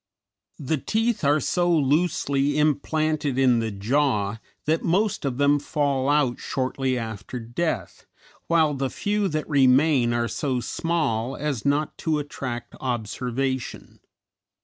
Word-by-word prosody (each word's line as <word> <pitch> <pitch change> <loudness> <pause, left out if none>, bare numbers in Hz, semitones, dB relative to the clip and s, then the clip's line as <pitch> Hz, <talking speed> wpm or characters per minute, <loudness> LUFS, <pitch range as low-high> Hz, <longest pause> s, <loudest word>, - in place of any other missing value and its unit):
The 150 +1 -1
teeth 225 - 0
are 145 +2 +4
so 175 +5 +1
loosely 145 -2 +1
implanted 150 -1 +1
in 125 -3 +4
the 115 -1 -1
jaw 105 0 0 0.3
that 160 +2 +1
most 190 +1 +1
of 130 -3 -2
them 145 +1 +3
fall 140 -2 0
out 145 -4 +2
shortly 130 0 -1
after 110 +1 -5
death, 120 - -3 0.4
while 160 -3 +3
the 135 -1 -2
few 205 +5 -1
that 155 -3 -2
remain 135 -2 +4
are 120 0 0
so 130 0 -1
small 135 -5 -1
as 145 -6 -3
not 145 +2 0
to 160 -2 0
attract 130 -4 -5
observation. 125 +2 -3
140 Hz, 125 wpm, -24 LUFS, 125-155 Hz, 0.4 s, are